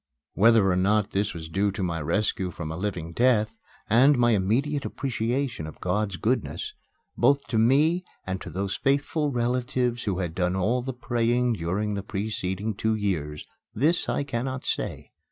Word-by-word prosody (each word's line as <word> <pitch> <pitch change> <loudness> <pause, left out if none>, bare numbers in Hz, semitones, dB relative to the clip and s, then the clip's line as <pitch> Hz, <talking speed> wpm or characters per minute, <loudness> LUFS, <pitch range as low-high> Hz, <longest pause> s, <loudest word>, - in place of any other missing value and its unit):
Whether 115 -1 +5
or - - +2
not 100 +2 +2
this 100 -2 -1
was 80 -1 -6
due 95 +5 +1
to 100 - -3
my 85 -3 -1
rescue 95 +3 0
from 85 -3 -6
a - - -4
living 85 -3 -4
death, 115 -2 +2 0.3
and 130 +6 +5
my 120 -1 +4
immediate 125 +9 +1
appreciation 125 - -2
of 80 - -10
God's 100 +1 -1
goodness, 130 - -1 0.4
both 140 0 +3
to 115 -2 +1
me 150 +10 +4 0.2
and 95 0 -3
to - - -7
those 95 +1 -2
faithful 145 +2 +1
relatives 125 -1 0
who 100 -4 0
had 90 -4 -2
done 90 +1 0
all 110 +7 +1
the 130 +2 -3
praying 120 -1 +1
during 100 +3 -1
the 100 - -2
preceding 100 0 -3
two 110 +2 0
years 80 -8 -2 0.3
this 155 +9 +1
I - - 0
cannot 130 0 -3
say. - - -3
110 Hz, 170 wpm, -26 LUFS, 95-125 Hz, 0.4 s, Whether